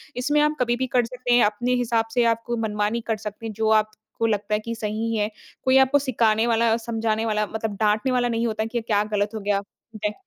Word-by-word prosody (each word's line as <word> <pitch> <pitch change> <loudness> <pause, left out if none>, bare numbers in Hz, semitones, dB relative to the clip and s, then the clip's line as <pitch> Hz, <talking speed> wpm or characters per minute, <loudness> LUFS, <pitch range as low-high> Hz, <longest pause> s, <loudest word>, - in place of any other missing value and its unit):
इसमें 290 +4 +1
आप 300 0 +2
कभी 240 -1 +2
भी 260 +1 -2
कर 245 -1 +2
सकते 245 0 -2
हैं, 240 - +6
अपने 240 +4 0
हिसाब 230 -2 +1
से, 240 0 +3
आपको 230 +1 0
मनमानी 210 +1 -1
कर 225 -1 0
सकते 210 +1 -7
हैं, 220 - -4
जो 220 +1 0
आपको 215 +1 0
लगता 210 0 -1
है 210 - +2
कि 230 - -3
सही 225 +1 -2
है। 210 0 0 0.3
कोई 260 +1 +4
आपको 265 +2 +5
सिखाने 230 -4 +1
वाला 230 -1 +2
और 225 - +3
समझाने 225 -1 -1
वाला, 210 -1 0
मतलब 220 -1 -3
डाँटने 215 +4 +2
वाला 245 -1 +2
नहीं 230 0 0
होता 220 -1 -2
कि, 235 +1 -3
क्या 210 -2 +1
गलत 205 0 +1
हो 220 - -3
गया 200 0 0 0.4
है। 210 - 0
225 Hz, 235 wpm, -24 LUFS, 215-240 Hz, 0.4 s, हैं